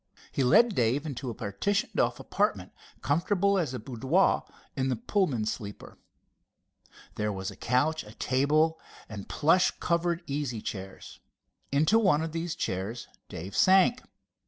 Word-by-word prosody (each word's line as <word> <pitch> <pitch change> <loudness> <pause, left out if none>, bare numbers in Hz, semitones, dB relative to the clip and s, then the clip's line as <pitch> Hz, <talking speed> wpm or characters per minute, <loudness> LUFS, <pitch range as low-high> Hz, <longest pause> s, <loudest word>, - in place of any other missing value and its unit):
He 135 - 0
led 230 - +5
Dave 125 +2 +1
into 135 -3 -5
a 115 - -5
partitioned 100 - -2
off - - +1
apartment, - - -1 0.3
comfortable 195 +6 +2
as 160 -7 -1
a - - -4
boudoir 130 - +1 0.3
in 135 -2 0
the 130 - +1
Pullman 185 - 0
sleeper. 105 -2 -6 1.2
There 105 0 0
was 95 -1 -4
a - - -12
couch, 145 +6 0
a 105 +2 -14
table 155 +5 +2 0.3
and 100 -3 -8
plush 175 +5 +3
covered 170 0 0
easy 140 -6 -3
chairs. 95 -2 -8 0.5
Into 155 +11 +4
one 180 -8 +3
of 165 - -4
the 165 +1 -3
chairs 110 - -4 0.2
Dave 95 +5 -7
sank. 190 - +5
145 Hz, 140 wpm, -28 LUFS, 115-170 Hz, 1.2 s, led